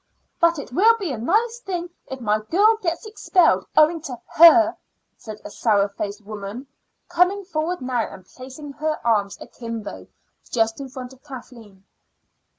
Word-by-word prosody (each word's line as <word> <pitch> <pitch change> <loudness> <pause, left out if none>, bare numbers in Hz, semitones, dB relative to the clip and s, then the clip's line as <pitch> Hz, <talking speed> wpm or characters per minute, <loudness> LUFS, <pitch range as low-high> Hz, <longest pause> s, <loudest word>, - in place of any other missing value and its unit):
"But 335 -1 +3
it 285 - -8
will 450 - +5
be 380 -8 -3
a 255 - -3
nice 450 - +1
thing 355 -6 -5 0.2
if 265 - -7
my 215 -3 +1
girl 400 - +3
gets 340 +2 -2
expelled 420 -5 +2
owing 315 +2 +5
to 255 -7 -7
her," 335 0 +7 0.4
said 215 -2 -10
a - - -7
sour 205 -3 +2
faced 200 +1 -6
woman, 210 +4 -7 0.4
coming 360 +3 +2
forward 345 -1 -2
now 250 -3 -2
and 185 - -12
placing 265 +6 -10
her 310 +2 -2
arms 205 -4 +1
akimbo 230 -3 -8 0.4
just 225 +2 0
in 270 - -7
front 255 0 -8
of 265 - -21
Kathleen. 235 -8 -12
270 Hz, 155 wpm, -22 LUFS, 225-345 Hz, 0.4 s, her